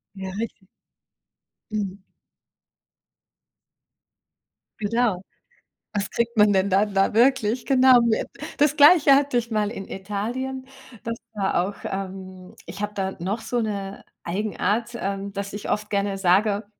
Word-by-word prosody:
Ja, 190 -1 -6
richtig. 220 -4 -6 1.0
Mhm. 200 -3 -3 2.8
Genau. 215 -3 0 0.7
Was 205 0 -2
kriegt 235 0 -1
man 210 -1 +5
denn 195 0 +2
dann 200 +2 +2
da 195 0 +4
da - - -10
wirklich? 240 -1 +3
Genau. 260 -2 +6 0.6
Das 295 0 +3
Gleiche 295 -1 +7
hatte 275 -2 +2
ich 235 0 -4
mal 210 -2 0
in 195 -4 -7
Italien. 240 +7 -4 0.4
Das 230 0 -4 0.2
war 195 -4 0
auch 200 +1 -7
ähm, 190 0 -6
ich 200 - -7
habe 205 0 -2
da 190 -1 -2
noch 195 +6 -3
so 240 +2 -2
'ne 200 -3 -4 0.2
Eigenart, 210 +4 -1
ähm, 195 0 -3
dass 200 0 -5
ich 205 - -5
oft 210 0 -1
gerne 200 -1 -1
sage, 200 +3 +2
205 Hz, 130 wpm, -24 LUFS, 195-235 Hz, 2.8 s, Gleiche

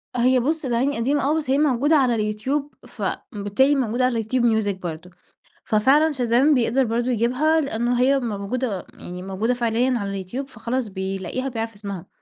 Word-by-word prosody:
هي 250 +1 +3
بُص 305 +4 -1
الأغاني 255 +3 0
قديمة 275 +5 +1
آه، 310 - +2
بس 290 -4 -3
هي 270 - +3
موجودة 290 +1 +3
على 230 -6 +2
الYoutube 275 +7 -4
فبالتالي 215 +6 0
موجودة 250 -1 +1
على 230 -3 0
الYoutube 245 +3 0 0.2
Music 200 -1 -1
برضه، 175 0 -6 0.6
ففعلًا 275 +9 +3
Shazam 255 +3 +3
بيقدر 245 +2 +2
برضه 235 +2 -1
يجيبها، 255 +8 +2
لأنّه 245 -3 -1
هي 270 +1 +4
موجودة 215 -1 -3
يعني 180 +1 -9
موجودة 200 +6 -1
فعليًا 240 +1 +1
على 200 -1 -4
الYoutube 260 +9 -5
فخلاص 245 -1 -3
بيلاقيها 190 +6 -4
بيعرف 225 -2 -4
اسمها. 200 -3 -7
240 Hz, 160 wpm, -23 LUFS, 210-265 Hz, 0.6 s, هي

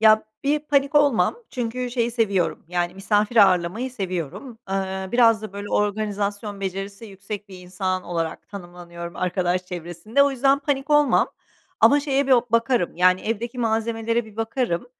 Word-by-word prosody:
Ya, 220 0 +6 0.2
bir 290 +2 +2
panik 285 -1 +1
olmam. 290 - +3
Çünkü 245 0 -3
şeyi 240 -1 0
seviyorum, 200 -9 0
yani, 175 0 -1
misafir 205 +3 0
ağırlamayı 195 +4 +3
seviyorum. 195 - -5
Iıı, 190 0 -3
biraz 230 -3 +4
da, 215 - -7
böyle, 200 +1 -6
organizasyon 205 0 -1
becerisi 195 +2 -5
yüksek 200 +1 -8
bir 185 - -11
insan 185 +1 -3
olarak 165 -2 -4
tanımlanıyorum 175 -3 -9
arkadaş 180 0 -1
çevresinde. 175 - -1
O 280 - +3
yüzden 270 +1 +3
panik 280 0 -2
olmam. 295 -1 +4 0.5
Ama 290 - +6
şeye 280 -1 0
bir 270 - +3
bakarım, 230 -5 +2
yani, 185 +1 +4
evdeki 230 +3 -3
malzemelere 225 0 0
bir 215 -1 -15
bakarım. 225 -3 -1
215 Hz, 150 wpm, -23 LUFS, 185-245 Hz, 0.5 s, Ya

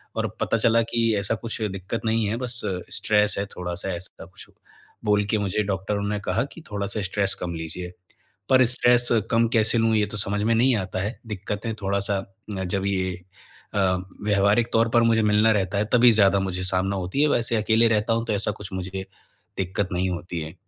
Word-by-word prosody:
और - - 0
पता - - +1
चला 115 +1 +3
कि 115 - +1 0.2
ऐसा 100 +3 0
कुछ 115 +1 -6
दिक्कत 95 +1 -3
नहीं 110 0 +1
है, 105 - -1
बस 120 -1 -4 0.4
स्ट्रेस 105 -1 +2
है 100 - -1
थोड़ा-सा 90 -1 -5
ऐसा 85 0 -8
कुछ, 90 +2 -14 0.6
बोल 105 0 +2
के 110 - +2
मुझे 100 +1 -1
डॉक्टरों 100 +1 -2
ने 105 0 -1
कहा 105 +6 +1
कि 165 - -11
थोड़ा-सा 100 +1 -2
स्ट्रेस 100 +1 +1
कम 85 -1 -3
लीजिए। 85 +2 -6 0.6
पर 130 -1 +6
स्ट्रेस 120 0 +4 0.2
कम 115 0 +3
कैसे 110 +1 +4
लूँ 115 0 +2
ये 105 -1 +2
तो 105 - -7
समझ 100 0 -1
में 115 +1 +2
नहीं 125 +2 +4
आता 95 -2 -3
है। 105 +5 -4
दिक्कतें 105 +2 -4
थोड़ा-सा 100 +1 0 0.4
अ, 95 - -2
जब 95 +2 -2
ये 95 -2 -1 0.6
अ, - - 0 0.4
व्यावहारिक 105 +3 +2
तौर 115 0 +3
पर 120 - +6
मुझे 115 -1 +3
मिलना 105 +1 +4
रहता 100 -1 0
है 105 - +2
तभी 125 0 +7
ज़्यादा 100 -2 +4
मुझे 95 -1 -2
सामना 95 +1 0
होती 95 +9 -1
है, 150 - +4
वैसे 120 -4 +1
अकेले 110 +2 +3
रहता 110 0 +1
हूँ 115 0 -1
तो - - -1
ऐसा 105 0 0
कुछ 100 0 -10
मुझे 95 +1 -5 0.5
दिक्कत 95 +1 -1
नहीं 90 +1 0
होती 85 -1 -4
है। 80 +1 -7
105 Hz, 200 wpm, -24 LUFS, 95-115 Hz, 0.6 s, तभी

